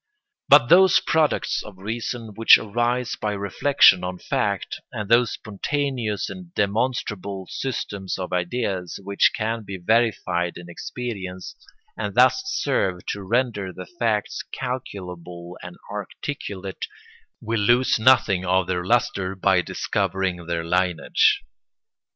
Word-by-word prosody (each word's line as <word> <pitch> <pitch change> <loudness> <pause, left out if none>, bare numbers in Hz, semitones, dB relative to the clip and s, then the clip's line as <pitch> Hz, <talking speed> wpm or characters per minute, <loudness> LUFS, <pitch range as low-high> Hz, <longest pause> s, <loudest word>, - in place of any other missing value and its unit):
But 140 -4 +7
those 185 +1 +7
products 160 -2 +1
of 105 -3 -11
reason 115 +2 -5
which 115 +2 +7
arise 120 +3 -1
by 105 -1 -2
reflection 100 +1 +4
on 90 0 -4
fact, - - -2
and 105 - -5
those 120 +2 +4
spontaneous 115 0 -2
and 180 -2 -9
demonstrable 100 -3 -1
systems 100 -7 -4
of 90 -1 -5
ideas 90 -1 -2
which 100 +1 +3
can 115 +1 -2
be 100 -1 -6
verified 90 -4 +1
in 85 0 -10
experience, 95 -3 -6 0.4
and - - -4
thus - - +5
serve 95 - -1
to 100 - -3
render 105 -2 -1
the 90 0 -9
facts 115 - -1
calculable 90 -8 -6
and 90 0 -9
articulate, 100 -2 -6 0.5
will 115 0 -2
lose 120 +3 +3
nothing 110 -6 +4
of 95 0 +2
their 90 -1 -2
lustre 95 -3 0
by 95 -1 +3
discovering 90 -1 -2
their 85 -1 -2
lineage. 90 -1 +2
100 Hz, 120 wpm, -23 LUFS, 90-120 Hz, 0.5 s, But